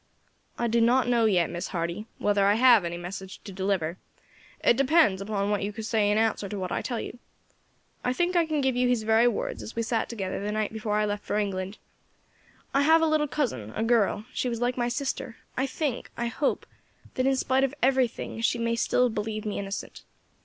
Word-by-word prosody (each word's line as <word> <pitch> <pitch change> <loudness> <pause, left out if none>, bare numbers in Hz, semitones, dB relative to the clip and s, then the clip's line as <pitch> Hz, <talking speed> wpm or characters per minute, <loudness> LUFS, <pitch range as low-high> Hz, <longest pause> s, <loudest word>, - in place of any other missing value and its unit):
"I 240 - -1
do 235 0 +2
not 245 +3 +4
know 235 -2 +3
yet, 180 -6 +2
Miss 170 0 -4
Hardy, 170 +4 -3
whether 200 -1 +2
I 205 - +4
have 235 -3 +6
any 170 0 -3
message 190 +2 -7
to 200 - -8
deliver; 190 -3 -1 0.7
it - - +5
depends 275 - +3
upon 200 0 -1
what 205 - 0
you 200 +1 -2
say 215 -1 0
in 210 - +2
answer 220 -2 +1
to 205 - -4
what 185 -1 -4
I - - -1
tell 240 -2 -3
you. 245 - -7 0.8
I 250 - +1
think 350 +7 0
I 335 -2 +3
can 305 -2 0
give 265 -2 +1
you 250 0 +2
his 245 -3 +1
very 220 +2 +4
words 240 - -2
as 220 - -8
we 230 - 0
sat 225 0 -1
together 195 -5 -3
the 210 - -2
night 215 0 -1
before 215 -1 -2
I 210 - +2
left 205 0 -3
for - - -2
England: 195 -1 -2 1.0
'I 275 - +3
have 320 +3 +5
a - - +5
little 310 -1 +2
cousin, 130 - -2
a 220 - -1
girl, 225 -2 +2
she 250 - -1
was 235 -1 -3
like 245 +1 0
my 240 -1 0
sister; 245 -1 -3 0.2
I 265 +2 0
think, 270 -2 -3
I 235 - -1
hope, 235 +5 -1 0.5
that 255 +1 0
in 270 - +3
spite 260 +1 +1
of 270 +1 0
everything 255 -3 +1
she 235 - +2
may 230 0 0
still 235 +2 +2
have 245 -3 +1
believed 215 0 -3
me 210 - -2
innocent. 195 0 -6
225 Hz, 220 wpm, -27 LUFS, 205-250 Hz, 1.0 s, have